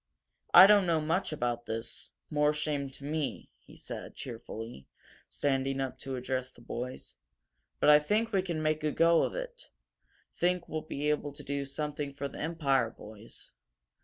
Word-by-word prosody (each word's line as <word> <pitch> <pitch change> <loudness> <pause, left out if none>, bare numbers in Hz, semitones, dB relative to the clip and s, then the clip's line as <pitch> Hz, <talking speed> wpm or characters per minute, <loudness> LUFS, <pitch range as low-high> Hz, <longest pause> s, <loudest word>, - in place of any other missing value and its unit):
"I 180 - +11
don't 200 -2 +6
know 165 -2 +3
much 160 +5 0
about 120 -5 -2
this 115 +1 -4 0.2
more 150 0 +3
shame 150 -2 -1
to 135 - -11
me," 150 0 -3
he - - -17
said, - - -7
cheerfully, 115 - -7 0.4
standing 135 -1 0
up 135 -1 -3
to 135 -1 -4
address 130 0 -2
the 130 - -20
boys. 125 +2 -6 0.6
"But 150 - +6
I 150 - +9
think 215 +9 +1
we 195 -3 +3
can 170 -4 -3
make 155 0 +1
a 155 - +2
go 165 +2 +4
of - - -1
it - - -6 0.6
think 180 0 +1
we'll 155 - -3
be 150 -1 -1
able 145 -1 -2
to 145 +1 -9
do 140 0 -2
something 145 0 -3
for 140 0 -3
the 140 - -10
Empire, 145 -7 +1
boys. 110 0 -9
145 Hz, 170 wpm, -31 LUFS, 130-160 Hz, 0.6 s, I